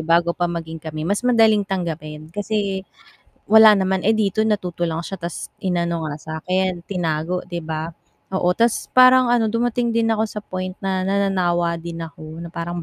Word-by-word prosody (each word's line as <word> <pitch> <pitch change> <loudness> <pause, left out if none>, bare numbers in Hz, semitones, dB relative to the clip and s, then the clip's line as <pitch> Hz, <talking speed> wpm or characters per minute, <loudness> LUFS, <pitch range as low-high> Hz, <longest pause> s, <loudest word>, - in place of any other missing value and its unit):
bago 170 +2 +2
pa 175 0 -1
maging 165 -1 -5
kami, 155 0 -5
mas 200 +4 0
madaling 225 -4 +4
tanggapin 160 -4 -4
kasi, 205 -1 -2 0.7
wala 220 -1 +9
naman. 190 0 0
Eh, - - +5
dito 215 0 +1
natuto 180 -5 -2
lang 165 0 -3
siya, 195 +2 -6
tas 170 -1 -6
inano 170 -3 -1
nga 150 - -4
sa'kin 180 +3 -2
tinago 175 -1 -2
'di 175 -1 -6
ba? 160 0 -4 0.4
Oo, 180 -1 +2
tas 230 0 +1
parang 255 -1 +6
ano 235 -2 +3
dumating 235 +1 0
din 230 -1 +2
ako 220 -1 +1
sa 210 -1 -7
point 185 -1 -5
na 190 -1 -1
nananawa 180 -4 +1
din 165 0 -6
ako 160 +1 -9
na 170 - -8
parang, 170 0 -4
180 Hz, 175 wpm, -21 LUFS, 165-210 Hz, 0.7 s, wala